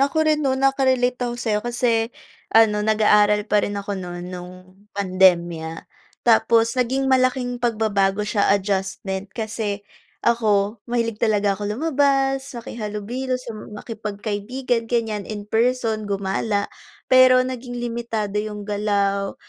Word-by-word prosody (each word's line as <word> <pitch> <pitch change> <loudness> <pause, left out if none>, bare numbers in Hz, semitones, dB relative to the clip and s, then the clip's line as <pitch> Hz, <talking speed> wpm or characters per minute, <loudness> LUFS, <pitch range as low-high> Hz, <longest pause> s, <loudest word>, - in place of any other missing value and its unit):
Ako 315 +3 +2
rin 305 -1 +2
nun 270 -2 0
naka-relate 260 -2 +2
ako 240 - -4
sa'yo 220 -3 -1
kasi 235 -1 0 0.5
ano, 210 -2 +5
nag-aaral 210 -1 +3
pa 210 -1 +2
rin 205 0 -3
ako 200 0 -4
nu'n, 175 -1 -6
'nung 180 0 -7 0.4
pandemya. 175 -4 +2 0.4
Tapos 230 0 +4
naging 260 +1 0
malaking 255 -2 +1
pagbabago 210 -4 +1
siya, 210 -1 +1
adjustment 190 0 -3
kasi 215 -2 -4 0.4
ako 210 -2 +2
mahilig 230 -2 -1
talaga 205 -2 +2
ako 205 +1 -4
lumabas, 270 +1 +1
makihalubilo 230 +3 -4
sa 250 -2 -8
makipagkaibigan, 215 +3 -4
ganiyan 220 -4 -1
in 210 -1 -5
person, 225 -1 0
gumala. 200 +1 -1 0.5
Pero 255 0 +7
naging 250 -1 -6
limitado 230 -4 -3
yung 210 -1 -5
galaw, 200 -1 0
220 Hz, 120 wpm, -22 LUFS, 205-245 Hz, 0.5 s, Pero